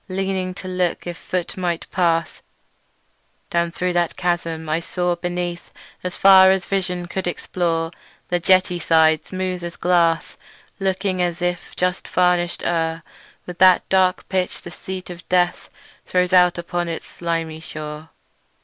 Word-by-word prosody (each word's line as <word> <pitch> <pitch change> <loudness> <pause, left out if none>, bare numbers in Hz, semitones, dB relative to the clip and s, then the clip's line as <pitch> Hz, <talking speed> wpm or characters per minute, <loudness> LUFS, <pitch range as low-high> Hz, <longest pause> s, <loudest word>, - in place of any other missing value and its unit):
Leaning 190 -1 -2
to 185 - -8
look 180 -2 -1
if 175 0 -4
foot 180 +1 -3
might 175 -3 -2
pass 165 -3 0 1.1
Down 170 0 +1
thro' 180 +1 -1
that 175 -1 0
chasm, 170 -3 -2
I 155 +1 +1
saw, 175 +1 -1
beneath, 175 0 -4 0.3
As 180 -1 -4
far 190 -1 +8
as 190 -1 +2
vision 180 -2 -1
could 185 +1 -4
explore, 165 -2 -1 0.4
The 175 - +1
jetty 180 0 +3
sides 160 -1 +3
as - - -15
smooth 185 -1 -3
as 170 0 -5
glass, 170 -2 +1 0.4
Looking 190 -1 0
as 175 -1 -1
if 175 0 -3
just 180 +1 -1
varnish'd 180 -1 +1
o'er 165 -1 -1 0.4
With 180 -1 -9
that 185 -1 +6
dark 185 -1 +2
pitch 185 -2 -1
the 175 - -8
Sea 185 +1 -6
of 180 0 -10
Death 180 -1 +1 0.4
Throws 180 0 +1
out 180 -1 +5
upon 175 0 -2
its 165 - -5
slimy 165 -2 -3
shore." 155 0 -8
175 Hz, 150 wpm, -21 LUFS, 170-185 Hz, 1.1 s, far